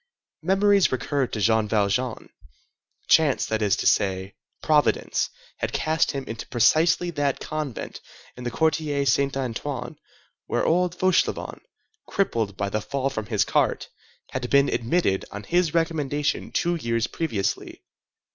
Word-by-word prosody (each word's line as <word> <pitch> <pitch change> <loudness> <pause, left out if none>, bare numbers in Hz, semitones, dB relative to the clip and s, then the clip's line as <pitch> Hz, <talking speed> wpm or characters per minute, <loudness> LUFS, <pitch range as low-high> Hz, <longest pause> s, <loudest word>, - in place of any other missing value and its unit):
Memories 195 +3 +3
recurred 130 +1 -1
to 110 - -3
Jean 110 +1 +2
Valjean. 110 +3 0 0.8
Chance, 155 -4 +4
that 110 0 -2
is 100 -2 +3
to - - -4
say, 95 -1 +1 0.3
Providence, 150 -2 +2 0.3
had - - -3
cast 160 +1 +1
him 140 -2 -3
into 115 - -6
precisely 165 +8 +3
that 145 -4 -1
convent 155 -6 -5 0.3
in 125 - -9
the 120 - -2
Quartier 150 +1 0
Saint 140 0 +2
Antoine 130 +1 -4 0.5
where - - 0
old 180 +1 +2
Fauchelevent, 185 -1 0 0.5
crippled 115 - -1
by 100 - -1
the 105 +2 -2
fall 135 +3 -2
from 110 -3 -4
his 110 -3 +1
cart, - - 0 0.4
had 125 -1 -3
been 140 0 +4
admitted 115 - +1
on 105 +1 -7
his 175 +1 +1
recommendation 150 -3 -1
two 175 - +1
years 115 -8 -1
previously. 115 -9 -3
140 Hz, 135 wpm, -24 LUFS, 110-160 Hz, 0.8 s, Chance